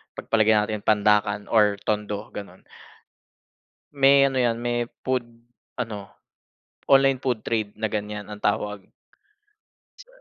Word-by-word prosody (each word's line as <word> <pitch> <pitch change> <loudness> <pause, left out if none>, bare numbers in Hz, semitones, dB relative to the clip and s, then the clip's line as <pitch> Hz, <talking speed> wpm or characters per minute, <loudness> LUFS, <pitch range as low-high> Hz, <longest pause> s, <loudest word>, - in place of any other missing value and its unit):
pagpalagay 110 -1 +2
natin 105 0 0
Pandacan 105 -1 +2
or 105 -2 +4
Tondo 105 0 -3
ganon. 100 -2 -10 1.3
May 140 0 +5
ano 135 -1 +2
yan, 120 -2 +2
may 120 0 -1 0.2
food 130 -2 -1 0.5
ano 110 -5 -5 0.8
online 135 -1 +4
food 125 -5 -2
trade 110 -3 -2
na 110 -1 -3
ganyan 105 0 -4
ang 105 -1 -9
tawag. 105 -1 -2 1.1
Sa - - -14
110 Hz, 120 wpm, -24 LUFS, 105-125 Hz, 1.3 s, May